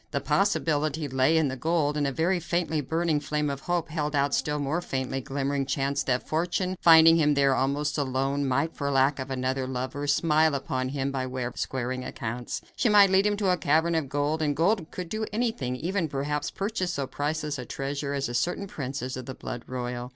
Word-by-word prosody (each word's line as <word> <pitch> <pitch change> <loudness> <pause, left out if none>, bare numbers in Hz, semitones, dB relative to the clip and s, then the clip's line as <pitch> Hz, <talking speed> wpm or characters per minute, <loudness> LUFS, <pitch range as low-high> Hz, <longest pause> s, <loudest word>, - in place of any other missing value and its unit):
The - - -1
possibility 155 -6 +1
lay 130 +4 +2
in 160 -2 +3
the 130 - -3
gold, 150 +1 0
and 145 -1 +1
a - - -1
very 170 +6 +1
faintly 170 -2 -1
burning 160 +2 0
flame 150 0 -1
of 140 - -5
hope 175 +1 -2
held 150 -2 -2
out 140 0 +2
the - - +2
still 150 0 -1
more 145 +4 -1
faintly 130 -4 -3
glimmering 140 +1 -1
chance 140 0 0
that 125 -1 -1
fortune, 175 +3 -1
finding 165 0 +8
him 150 -2 +3
there 140 -1 +4
almost 145 +3 0
alone, 135 +1 0
might, 140 +5 0
for 140 -1 -2
lack 135 +1 +2
of 130 +1 -5
another 130 0 -1
lover, 130 +3 -3
smile 155 +1 +3
upon 130 -1 -2
him 140 0 -2
by 130 -1 -2
way 130 0 -4
of 120 - -5
squaring 130 0 -2
accounts. 120 -1 -5
She 240 - +2
might 200 -2 +7
lead 195 +2 +4
him 205 0 0
to 200 -3 +2
a 180 - +2
cavern 160 +2 +2
of 160 -5 -1
gold, 145 +3 0
and 145 -2 +1
gold 175 +2 +1
would 180 -1 -3
do 215 +2 -3
anything; 210 - -1
even, 175 +5 -1
perhaps, 145 +1 -2
purchase 195 -3 -2
so 140 -4 -2
priceless 150 +1 -3
a 125 - -5
treasure 140 +2 -3
as 140 0 -1
a 120 - -6
certain 175 +11 -1
princess 135 -6 -5
of 130 -1 -7
the 130 - -6
blood 120 - -6
royal. 125 -1 -4
145 Hz, 215 wpm, -27 LUFS, 135-165 Hz, -, finding